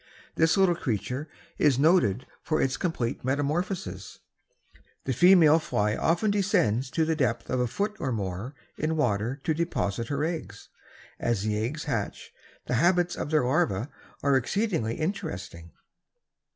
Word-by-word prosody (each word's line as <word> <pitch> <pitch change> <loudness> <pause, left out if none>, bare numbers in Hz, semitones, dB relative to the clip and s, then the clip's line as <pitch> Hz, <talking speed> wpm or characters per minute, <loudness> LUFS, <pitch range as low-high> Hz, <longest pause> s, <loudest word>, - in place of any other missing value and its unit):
This 160 +2 +3
little 190 -2 +4
creature 130 - -3 0.3
is 145 -4 +4
noted 140 - +3 0.2
for 155 - -1
its 135 0 +1
complete 145 -10 -2
metamorphosis. 140 - -2 0.9
The 130 - 0
female 165 0 +6
fly 105 -8 0
often 175 +6 +1
descends 180 - +1
to 160 +3 +1
the 160 0 0
depth 130 -6 -1
of 130 - 0
a 125 - +1
foot 205 - -2
or 130 - -2
more 105 +4 -4 0.2
in 160 +1 0
water 120 0 0
to 160 - +1
deposit 120 -9 -2
her 145 0 -1
eggs. 165 0 -5 0.5
As 115 -5 0
the 105 0 -1
eggs 150 +7 -3
hatch 115 -9 -4 0.3
the - - -3
habits 175 0 +3
of - - -4
their 155 -5 +2
larvae 130 - 0 0.3
are 140 -1 +3
exceedingly 160 - -1
interesting. 95 - -4
140 Hz, 145 wpm, -27 LUFS, 115-165 Hz, 0.9 s, female